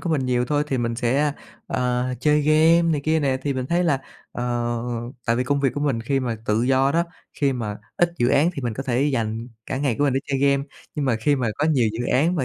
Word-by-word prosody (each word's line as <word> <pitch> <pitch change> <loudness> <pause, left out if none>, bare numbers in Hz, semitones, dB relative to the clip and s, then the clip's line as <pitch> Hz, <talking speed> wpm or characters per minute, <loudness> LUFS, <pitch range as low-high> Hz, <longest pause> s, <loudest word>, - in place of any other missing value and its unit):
của 170 - -3
mình 140 -5 0
nhiều 125 -1 +1
thôi 145 +3 +1
thì 135 -3 -1
mình 115 -1 -1
sẽ, 135 +5 +1 0.3
ờ, 125 0 0 0.2
chơi 150 +2 +3
game 155 +3 +5
này 165 -3 +1
kia 160 0 +2
nè, 135 -3 +1
thì 140 - 0
mình 130 -1 -2
thấy 175 +3 +1
là, 145 -5 +2 0.3
ờ, 120 -1 -1 0.5
tại 115 0 +2
vì 125 - 0
công 140 +2 0
việc 135 - +2
của 145 - -3
mình 140 -6 0
khi 135 +4 0
mà 120 -3 -2
tự 105 +2 +2
do 135 +2 +3
đó, 170 +1 +2 0.3
khi 140 -2 +1
mà 110 -5 -4 0.2
ít 175 0 +3
dự 120 - +3
án 145 +5 +4
thì 140 - -5
mình 120 -3 -2
có 135 - -4
thể 130 0 0
dành 115 -4 -1 0.2
cả - - -3
ngày 135 -3 0
của 145 - +3
mình 140 - +2
để 135 - +1
chơi 135 - -1
game, 140 0 +3 0.3
nhưng 150 -2 -1
mà 120 -4 +2
khi 145 +6 +1
mà 125 -3 0
có 150 - +1
nhiều 130 -8 +3
dự 120 +2 -3
án 160 +8 +3
mà 140 - 0
135 Hz, 265 wpm, -23 LUFS, 120-145 Hz, 0.5 s, game